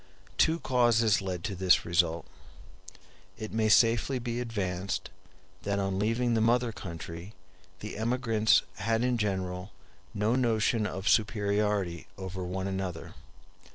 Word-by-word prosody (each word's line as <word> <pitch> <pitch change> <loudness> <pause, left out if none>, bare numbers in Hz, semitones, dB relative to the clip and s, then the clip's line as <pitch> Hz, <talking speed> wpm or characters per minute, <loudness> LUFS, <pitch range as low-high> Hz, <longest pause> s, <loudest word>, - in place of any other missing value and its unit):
Two 160 +1 +4
causes 120 -6 +3
led 90 -3 -4
to 100 - -3
this 95 -1 +3
result. 85 -1 +1 1.1
It 110 -1 -6
may 110 -1 +1
safely 115 +4 +4
be 120 -1 -3
advanced, 100 -6 -3 0.5
that 100 0 -1
on 95 -1 -1
leaving 115 +3 +1
the 115 - +2
mother 120 +1 +2
country 85 0 -8 0.5
the 105 - -6
emigrants 115 -2 +2
had 115 +3 0
in 125 -1 +1
general 95 -2 -2 0.4
no 105 +3 +1
notion 115 -3 +1
of 95 +2 -5
superiority 105 -5 +1
over 95 -1 -5
one 95 +1 -3
another. 95 -3 -4
105 Hz, 125 wpm, -29 LUFS, 95-115 Hz, 1.1 s, Two